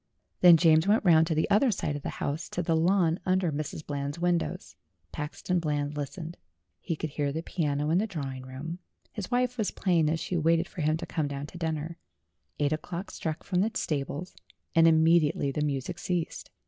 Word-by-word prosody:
Then 175 Hz, -2 st, +8 dB
James 160 Hz, +1 st, +4 dB
went 215 Hz, +1 st, +3 dB
round 160 Hz, -2 st, +6 dB
to 160 Hz, -, 0 dB
the 155 Hz, -, +1 dB
other 245 Hz, +6 st, +5 dB
side 165 Hz, -8 st, -1 dB
of 145 Hz, -, -5 dB
the -, -, -4 dB
house, 150 Hz, +3 st, -3 dB
to 180 Hz, -, -2 dB
the 165 Hz, 0 st, +1 dB
lawn 170 Hz, 0 st, +2 dB
under 185 Hz, -2 st, +1 dB
Mrs. 155 Hz, +1 st, -4 dB
Eland's 140 Hz, 0 st, -3 dB
windows. 175 Hz, 0 st, -1 dB, 0.4 s
Paxton 160 Hz, +4 st, -2 dB
Bland 150 Hz, -2 st, -2 dB
listened. 155 Hz, +4 st, -5 dB, 0.4 s
He 165 Hz, -, -3 dB
could 155 Hz, -1 st, -4 dB
hear 145 Hz, -1 st, -1 dB
the 160 Hz, +3 st, -4 dB
piano 150 Hz, -3 st, -1 dB
in 170 Hz, -, +4 dB
the 220 Hz, -, 0 dB
drawing 135 Hz, -8 st, -5 dB
room; 135 Hz, +7 st, -7 dB, 0.3 s
his 205 Hz, -4 st, -6 dB
wife 250 Hz, 0 st, 0 dB
was 215 Hz, -, +1 dB
playing 170 Hz, -5 st, +1 dB
as 160 Hz, +1 st, 0 dB
she 175 Hz, +3 st, -2 dB
waited 165 Hz, +1 st, +2 dB
for 185 Hz, -, -7 dB
him 155 Hz, +1 st, +2 dB
to -, -, -6 dB
come 155 Hz, -3 st, -2 dB
down 140 Hz, 0 st, -5 dB
to 160 Hz, -, -11 dB
dinner. 160 Hz, 0 st, -3 dB, 0.6 s
Eight 145 Hz, 0 st, +1 dB
o'clock 170 Hz, +5 st, -5 dB
struck 160 Hz, -1 st, -4 dB
from 180 Hz, -2 st, 0 dB
the 215 Hz, -, +2 dB
stables, 145 Hz, +3 st, -3 dB, 0.4 s
and 165 Hz, -1 st, +6 dB
immediately 160 Hz, -3 st, +4 dB
the 150 Hz, -, -2 dB
music 140 Hz, -3 st, -2 dB
ceased. 175 Hz, -3 st, -3 dB
160 Hz, 200 wpm, -28 LUFS, 150-175 Hz, 0.6 s, Then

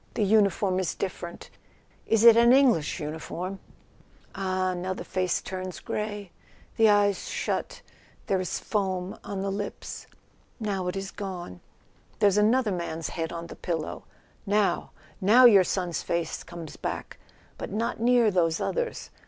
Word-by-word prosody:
The 220 Hz, -, +1 dB
uniform 200 Hz, -2 st, +3 dB
is 185 Hz, -, -2 dB
different—is 190 Hz, +4 st, -4 dB
it 235 Hz, -1 st, +10 dB
an 235 Hz, +1 st, +6 dB
English 245 Hz, -, +3 dB
uniform?... 170 Hz, +5 st, -5 dB, 0.7 s
Ah, 185 Hz, -1 st, -1 dB
now 185 Hz, +1 st, -3 dB
the -, -, -6 dB
face 185 Hz, -1 st, -1 dB
turns 185 Hz, -2 st, -5 dB
grey; 205 Hz, -3 st, -4 dB, 0.4 s
the 225 Hz, -1 st, +5 dB
eyes 205 Hz, -1 st, +3 dB
shut, -, -, -3 dB, 0.4 s
there 190 Hz, -, +1 dB
is 180 Hz, -, -2 dB
foam 190 Hz, -3 st, -2 dB
on 195 Hz, -1 st, -4 dB
the 195 Hz, -, -1 dB
lips. 200 Hz, +1 st, -6 dB, 0.5 s
Now 195 Hz, -4 st, -2 dB
it 180 Hz, -, -2 dB
is 195 Hz, 0 st, -4 dB
gone—there's 190 Hz, -, -4 dB
another 220 Hz, +1 st, +3 dB
man's 170 Hz, -3 st, -3 dB
head 165 Hz, -1 st, -3 dB
on 170 Hz, 0 st, -5 dB
the 170 Hz, -, -9 dB
pillow... 165 Hz, -3 st, -4 dB, 0.4 s
Now, 205 Hz, 0 st, +1 dB, 0.3 s
now 225 Hz, +7 st, +7 dB
your 205 Hz, -6 st, +8 dB
son's 180 Hz, -1 st, -2 dB
face 170 Hz, -1 st, -2 dB
comes 165 Hz, -2 st, -9 dB
back; -, -, -5 dB, 0.4 s
but -, -, -5 dB
not 220 Hz, +3 st, -2 dB
near 235 Hz, -1 st, +4 dB
those 165 Hz, -3 st, +1 dB
others. 485 Hz, -1 st, -3 dB
190 Hz, 140 wpm, -27 LUFS, 180-210 Hz, 0.7 s, it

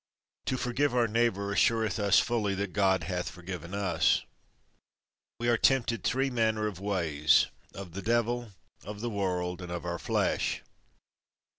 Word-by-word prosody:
To 130 Hz, -, 0 dB
forgive 125 Hz, +2 st, 0 dB
our 120 Hz, -2 st, +3 dB
neighbour, 105 Hz, -3 st, 0 dB
assureth 110 Hz, +2 st, +2 dB
us 100 Hz, -2 st, +4 dB
fully 110 Hz, -5 st, +1 dB
that 100 Hz, -1 st, -3 dB
God 95 Hz, -2 st, +2 dB
hath 90 Hz, -2 st, -3 dB
forgiven 90 Hz, 0 st, -7 dB
us. 95 Hz, -6 st, +2 dB, 1.2 s
We 120 Hz, -, -1 dB
are 120 Hz, -1 st, +4 dB
tempted 120 Hz, -4 st, +2 dB
three 135 Hz, +1 st, +1 dB
manner 110 Hz, -3 st, +1 dB
of 100 Hz, -4 st, -4 dB
ways—of 90 Hz, 0 st, 0 dB
the 100 Hz, -, -5 dB
devil, 120 Hz, +1 st, 0 dB, 0.3 s
of 105 Hz, +1 st, -7 dB
the 120 Hz, 0 st, -2 dB
world, 90 Hz, -3 st, -2 dB
and 90 Hz, -1 st, -7 dB
of 85 Hz, 0 st, -4 dB
our 85 Hz, -1 st, -3 dB
flesh. -, -, 0 dB
100 Hz, 145 wpm, -29 LUFS, 90-115 Hz, 1.2 s, us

